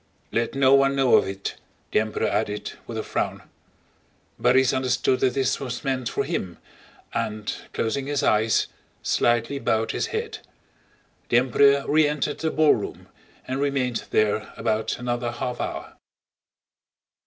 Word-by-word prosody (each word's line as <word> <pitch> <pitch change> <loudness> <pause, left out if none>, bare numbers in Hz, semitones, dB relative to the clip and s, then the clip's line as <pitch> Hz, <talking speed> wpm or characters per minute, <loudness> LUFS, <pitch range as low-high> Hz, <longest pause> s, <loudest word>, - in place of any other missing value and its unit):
"Let 115 +2 -1
no 135 -1 +5
one 135 0 +4
know 135 -2 +3
of - - +4
it!" 95 0 -5 0.3
the - - +4
Emperor 110 0 -1
added 105 -1 -1 0.2
with - - -5
a - - -2
frown. - - -2 1.0
Borís 130 +1 +4
understood 130 0 +1
that 130 -2 +1
this 135 -2 +1
was 130 -4 -5
meant 130 -3 -1
for - - -1
him 90 -3 -3 0.6
and, 105 -1 -2 0.2
closing 135 +5 -2
his 145 0 -1
eyes, 110 -1 +3 0.4
slightly 120 +4 +1
bowed 115 -1 0
his - - -1
head. - - -4 0.9
The - - +4
Emperor 140 +3 +4
re 155 0 +4
entered 150 0 -2
the 160 - 0
ballroom 155 -10 +1 0.4
and 130 +2 -2
remained 135 -4 0
there 110 0 +1
about 110 0 -1
another 120 -1 -2
half 125 +1 -3
hour. - - -5
125 Hz, 140 wpm, -24 LUFS, 110-140 Hz, 1.0 s, no